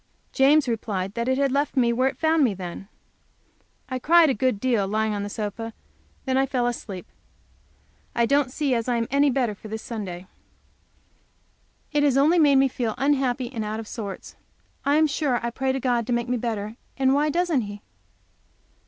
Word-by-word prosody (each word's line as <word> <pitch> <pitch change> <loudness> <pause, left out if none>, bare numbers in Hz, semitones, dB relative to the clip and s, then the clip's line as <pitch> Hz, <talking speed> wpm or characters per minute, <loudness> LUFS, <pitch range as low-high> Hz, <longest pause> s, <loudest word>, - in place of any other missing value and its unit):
James 285 +1 +4
replied 205 -5 -2
that 235 +1 -2
it 260 0 +1
had 275 -1 +1
left 280 +1 -1
me 235 -2 +3
where 255 +3 +2
it 270 - -3
found 320 -1 +3
me, 225 -7 +2
then. 185 +1 -7 1.0
I 255 -1 -3
cried 325 +2 +5
a - - +1
good 255 -1 0
while, 230 -6 +2
lying 215 +1 0
on 205 - -2
the 205 - -4
sofa, 210 +1 -4
and 225 0 -6 0.5
then 260 -1 +1
I 270 - +2
fell 250 -2 0
asleep. 210 -6 -4 1.1
I 235 - +3
don't 280 +1 +2
see 285 -1 0
as 230 0 -1
I 245 - +2
am 230 -1 0
any 280 +1 +4
the - - -1
better 245 -5 +1
for 205 - -12
this 220 +1 -6
Sunday, 190 -6 -6 1.7
it 295 -1 +2
has 280 -2 +3
only 315 +6 +4
made 290 -3 +5
me 270 0 +5
feel 240 -4 -3
unhappy 265 -2 0
and 225 -3 -3
out 215 +1 -3
of 225 - -7
sorts. 205 -5 -7 0.5
I 285 +1 +3
am 315 +1 +5
sure 280 -4 0
I 235 - -2
pray 265 +2 -1
to 265 - -2
God 240 -3 0
to 245 - 0
make 235 0 -1
me 250 0 0
better, 220 -1 -4 0.2
and 265 -1 +3
why 295 +2 +2
doesn't 340 -3 +1
He? 205 -1 -8
245 Hz, 205 wpm, -24 LUFS, 220-275 Hz, 1.7 s, cried